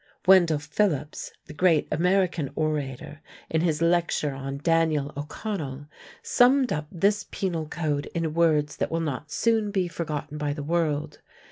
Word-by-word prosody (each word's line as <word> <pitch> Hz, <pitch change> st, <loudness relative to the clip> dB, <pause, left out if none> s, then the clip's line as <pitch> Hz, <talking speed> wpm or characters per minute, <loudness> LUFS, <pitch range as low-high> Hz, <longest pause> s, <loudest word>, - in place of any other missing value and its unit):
Wendell 180 Hz, -4 st, +6 dB
Phillips, 150 Hz, 0 st, -1 dB
the 150 Hz, -, -10 dB
great 165 Hz, 0 st, +3 dB
American 180 Hz, -2 st, +1 dB
orator, 150 Hz, -2 st, -3 dB, 0.3 s
in 160 Hz, -, +2 dB
his 165 Hz, -2 st, +1 dB
lecture 170 Hz, -4 st, +1 dB
on 135 Hz, 0 st, -5 dB
"Daniel 155 Hz, -2 st, +1 dB
O'Connell," 145 Hz, -2 st, -5 dB, 0.4 s
summed 255 Hz, +1 st, +4 dB
up 150 Hz, 0 st, -3 dB
this 200 Hz, +4 st, +1 dB
Penal 170 Hz, -5 st, -2 dB
Code 150 Hz, -3 st, -2 dB
in 165 Hz, -2 st, -1 dB
words 155 Hz, -3 st, +2 dB
that -, -, -1 dB
will 165 Hz, -, -1 dB
not 150 Hz, -2 st, -3 dB
soon 225 Hz, +3 st, +1 dB
be 190 Hz, -3 st, 0 dB
forgotten 150 Hz, -3 st, -5 dB
by 145 Hz, -1 st, -1 dB
the 145 Hz, -1 st, -6 dB
world. 155 Hz, -2 st, -1 dB
160 Hz, 145 wpm, -26 LUFS, 150-175 Hz, 0.4 s, Wendell